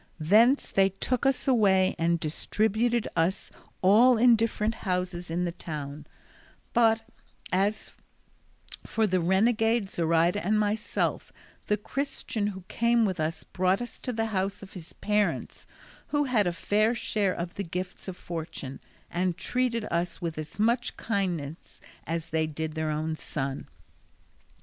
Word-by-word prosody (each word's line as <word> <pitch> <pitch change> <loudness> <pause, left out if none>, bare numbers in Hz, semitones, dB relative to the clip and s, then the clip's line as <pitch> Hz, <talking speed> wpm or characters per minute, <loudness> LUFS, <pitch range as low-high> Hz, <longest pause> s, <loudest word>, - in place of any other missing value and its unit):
Thence 220 - +4
they 195 0 +4
took 250 +7 -1
us 270 +1 0
away 195 -7 +4
and 170 +1 +2
distributed 220 +8 0
us 170 +4 0 0.3
all 230 +6 +6
in 240 +1 +6
different 225 -1 0
houses 180 -2 -2
in 175 +2 0
the 175 - -1
town; 150 -3 -7 0.7
but 225 -1 +4 0.5
as 200 +3 0 0.9
for 225 - 0
the 185 -3 +1
renegade, 225 +4 +2
Zoraida, 170 +3 +2
and 210 +4 +2
myself, 210 +1 -1 0.4
the 210 - +2
Christian 255 -2 -3
who 190 -2 -5
came 235 0 +2
with 185 -4 -2
us 160 +1 -2
brought 185 +1 +1
us 240 0 -7
to 250 - -3
the 225 -1 -1
house 195 +1 -1
of 190 - -12
his 170 -4 -10
parents, 210 -1 -1 0.4
who 290 0 +1
had 235 -8 +2
a - - +2
fair 215 +7 +1
share 205 -4 0
of 170 0 -4
the 200 - -4
gifts 180 +2 -5
of 185 -1 -6
fortune, 160 -5 -6 0.3
and 180 0 0
treated 245 -3 -1
us 170 +1 -1
with 170 -3 -3
as 155 -1 -7
much 235 +3 +1
kindness 175 -8 -3 0.3
as 165 0 -3
they 160 0 +1
did 155 0 -4
their 155 0 -2
own 155 +1 -1
son. 135 -3 -4
195 Hz, 145 wpm, -28 LUFS, 170-225 Hz, 0.9 s, all